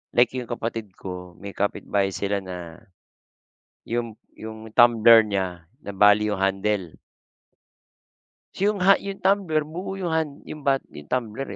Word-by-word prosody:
like 120 Hz, 0 st, +5 dB
yung 125 Hz, -2 st, -5 dB
kapatid 115 Hz, -4 st, -5 dB
ko 90 Hz, -1 st, -8 dB
may 100 Hz, 0 st, -9 dB
kapitbahay 100 Hz, -1 st, -1 dB
sila 100 Hz, 0 st, -1 dB
na 90 Hz, -3 st, -8 dB, 1.0 s
yung 115 Hz, -1 st, -3 dB, 0.2 s
yung 110 Hz, 0 st, -9 dB
tumbler 115 Hz, -1 st, +6 dB
niya 95 Hz, -4 st, -3 dB, 0.2 s
nabali 105 Hz, +1 st, +3 dB
yung 105 Hz, -, -2 dB
handle. 95 Hz, -2 st, -1 dB, 1.7 s
Yung 200 Hz, -2 st, +1 dB
ha 195 Hz, 0 st, +6 dB
yung 195 Hz, -1 st, -5 dB
tumbler 185 Hz, -6 st, +1 dB
buo 180 Hz, +5 st, -6 dB
yung 175 Hz, -4 st, -3 dB
han 155 Hz, -3 st, -2 dB
yung 155 Hz, -, -8 dB
bat 135 Hz, -2 st, +1 dB
yung 75 Hz, 0 st, -11 dB
tumbler, 125 Hz, +1 st, -3 dB
110 Hz, 135 wpm, -24 LUFS, 95-140 Hz, 1.7 s, tumbler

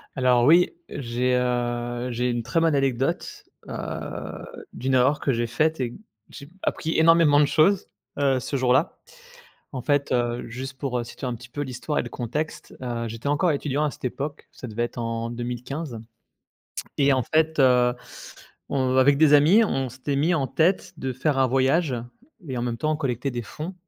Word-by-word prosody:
Alors 125 Hz, -2 st, +3 dB
oui, 170 Hz, +6 st, +5 dB, 0.2 s
j'ai, 125 Hz, 0 st, -1 dB
heu, 120 Hz, 0 st, -1 dB
j'ai 125 Hz, +1 st, 0 dB
1 120 Hz, -1 st, -1 dB
très 125 Hz, +8 st, 0 dB
bonne 165 Hz, -2 st, +2 dB
anecdote. 135 Hz, -2 st, -1 dB, 0.2 s
Heu, -, -, -5 dB, 1.0 s
d'une 130 Hz, +2 st, -2 dB
erreur 130 Hz, +4 st, +3 dB
que 140 Hz, -, +1 dB
j'ai 120 Hz, -1 st, 0 dB
faite 155 Hz, +7 st, 0 dB
et 125 Hz, -2 st, -1 dB
d -, -, -12 dB, 0.3 s
j'ai 140 Hz, -1 st, -11 dB
appris 160 Hz, 0 st, -1 dB
énormément 160 Hz, -2 st, +6 dB
de 150 Hz, -, +5 dB
choses, 180 Hz, +7 st, +3 dB, 0.3 s
heu, 135 Hz, -2 st, +2 dB
ce 135 Hz, -, -4 dB
jour 125 Hz, -1 st, +3 dB
là. 145 Hz, +7 st, +1 dB, 0.7 s
En 130 Hz, -, -5 dB
fait, 145 Hz, +1 st, 0 dB
heu, 120 Hz, -1 st, 0 dB
juste 130 Hz, +2 st, -7 dB
pour, 130 Hz, -3 st, -2 dB
heu, -, -, -2 dB
situer 125 Hz, +2 st, -7 dB
un 125 Hz, -, -2 dB
petit 120 Hz, +1 st, -12 dB
peu 145 Hz, +4 st, -5 dB
l'histoire 140 Hz, +2 st, -3 dB
et -, -, 0 dB
le -, -, -7 dB
contexte, 145 Hz, +6 st, -4 dB
heu, 120 Hz, -2 st, -3 dB
j'étais 115 Hz, +4 st, -6 dB
encore 160 Hz, +4 st, +2 dB
étudiant 145 Hz, 0 st, -1 dB
à 150 Hz, -, -1 dB
cette -, -, -15 dB
époque, 140 Hz, +4 st, -4 dB
ça 125 Hz, -, -9 dB
devait 115 Hz, +1 st, -2 dB
être 120 Hz, -, -5 dB
en 115 Hz, 0 st, -3 dB
2015 120 Hz, +3 st, -5 dB, 1.0 s
et 140 Hz, -1 st, +4 dB
en 130 Hz, -1 st, +1 dB
fait, 160 Hz, +3 st, +1 dB
heu, 125 Hz, -2 st, +5 dB, 0.8 s
on, 130 Hz, -2 st, +1 dB
avec 140 Hz, +2 st, +5 dB
des 150 Hz, -1 st, +5 dB
amis 160 Hz, +10 st, +6 dB
on 135 Hz, -9 st, -1 dB
s'était 130 Hz, +3 st, -4 dB
mis 160 Hz, +5 st, +2 dB
en 140 Hz, -6 st, 0 dB
tête 180 Hz, +6 st, +1 dB
de 130 Hz, -3 st, -3 dB
faire 135 Hz, +3 st, 0 dB
un 130 Hz, -, +4 dB
voyage 135 Hz, +3 st, +2 dB, 0.5 s
et 130 Hz, -2 st, -3 dB
en -, -, -2 dB
même 120 Hz, -1 st, -2 dB
temps 155 Hz, +6 st, 0 dB
on -, -, -2 dB
collectait 135 Hz, -2 st, -2 dB
des 120 Hz, -1 st, -3 dB
fonds, 155 Hz, -, -7 dB
130 Hz, 195 wpm, -24 LUFS, 120-150 Hz, 1.0 s, énormément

